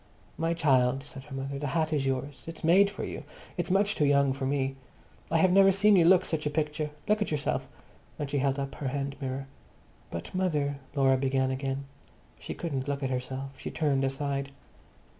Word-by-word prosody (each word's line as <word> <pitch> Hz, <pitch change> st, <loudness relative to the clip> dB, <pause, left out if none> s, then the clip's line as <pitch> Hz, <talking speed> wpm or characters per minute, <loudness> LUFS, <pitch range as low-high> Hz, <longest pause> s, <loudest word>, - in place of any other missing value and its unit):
"My 165 Hz, +1 st, 0 dB
child!" 135 Hz, -4 st, +3 dB
said 135 Hz, -2 st, -10 dB
her 145 Hz, -2 st, -8 dB
mother, 135 Hz, +1 st, -4 dB
"the 145 Hz, -, -2 dB
hat 160 Hz, +2 st, 0 dB
is 140 Hz, -3 st, +1 dB
yours. 135 Hz, +2 st, -3 dB
It's 165 Hz, -1 st, -8 dB
made 190 Hz, +5 st, +6 dB
for 205 Hz, -, -6 dB
you. -, -, -5 dB, 0.3 s
It's -, -, -2 dB
much 200 Hz, +2 st, +3 dB
too 150 Hz, -, 0 dB
young 140 Hz, -1 st, +4 dB
for 135 Hz, 0 st, -3 dB
me. 135 Hz, -1 st, 0 dB, 0.5 s
I 165 Hz, -, +2 dB
have 180 Hz, +3 st, +4 dB
never 195 Hz, +1 st, +7 dB
seen 205 Hz, +2 st, +5 dB
you 175 Hz, -3 st, +5 dB
look 185 Hz, +1 st, +6 dB
such 155 Hz, -2 st, -1 dB
a -, -, +1 dB
picture. 150 Hz, 0 st, -1 dB, 0.2 s
Look 210 Hz, 0 st, +2 dB
at 210 Hz, -, 0 dB
yourself!" 150 Hz, -2 st, -1 dB, 0.5 s
And 145 Hz, -, -3 dB
she 140 Hz, 0 st, 0 dB
held 135 Hz, 0 st, +1 dB
up 135 Hz, -1 st, -3 dB
her 140 Hz, -, -4 dB
hand 140 Hz, +1 st, -2 dB
mirror. 135 Hz, 0 st, -3 dB, 0.6 s
"But, 85 Hz, -, -6 dB
mother," 150 Hz, -7 st, 0 dB, 0.2 s
Laura 135 Hz, -1 st, +4 dB
began 130 Hz, 0 st, +1 dB
again. 135 Hz, +1 st, -3 dB, 0.5 s
She -, -, -6 dB
couldn't 140 Hz, -6 st, -3 dB
look 140 Hz, 0 st, -2 dB
at 130 Hz, -, -1 dB
herself; 130 Hz, +2 st, -4 dB
she -, -, -5 dB
turned 140 Hz, -4 st, +1 dB
aside. 140 Hz, 0 st, -1 dB
140 Hz, 200 wpm, -29 LUFS, 135-160 Hz, 0.6 s, never